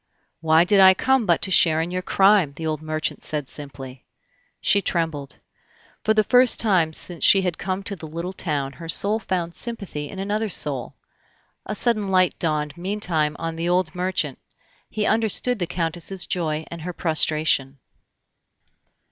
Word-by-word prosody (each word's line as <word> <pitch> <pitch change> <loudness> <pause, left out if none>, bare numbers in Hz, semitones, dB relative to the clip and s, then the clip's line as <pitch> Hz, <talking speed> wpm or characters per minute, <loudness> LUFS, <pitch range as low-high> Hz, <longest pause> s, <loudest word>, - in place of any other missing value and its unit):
"Why 160 +1 +4
did 195 +3 +3
I 190 -1 +8
come 265 0 +1
but 170 -2 +2
to 190 - -2
share 160 -3 +5
in 165 +2 -2
your 185 0 -2
crime?" 190 -5 +3
the 160 - -6
old 155 -1 -2
merchant 155 0 -3
said 150 -3 -3
simply. 135 -3 -8 0.6
She 200 - +3
trembled. 160 -7 -2 0.7
For 220 - +2
the 215 - +4
first 250 +3 +4
time 185 -8 +2
since 170 +2 -6
she 195 -1 +7
had 180 -3 -2
come 190 +1 -3
to 200 - -5
the 160 -3 -9
little 170 +4 -5
town 145 -7 -3
her 165 +1 -10
soul 205 +6 +1
found 175 -5 -3
sympathy 200 -12 -4
in 195 - -9
another 210 +3 -2
soul. 140 -8 -3 0.7
A 215 - -3
sudden 215 -3 0
light 185 -1 +3
dawned 150 -3 -1
meantime 175 -5 -1
on 165 0 -5
the 170 +1 -2
old 180 -3 +1
merchant; 180 -6 -2 0.5
he 210 -1 -2
understood 225 +2 +1
the 175 - -2
Countess's 175 +2 -3
joy 160 -3 -2
and 170 -1 -7
her 180 +2 -5
prostration. 155 -4 +1
175 Hz, 165 wpm, -22 LUFS, 155-195 Hz, 0.7 s, I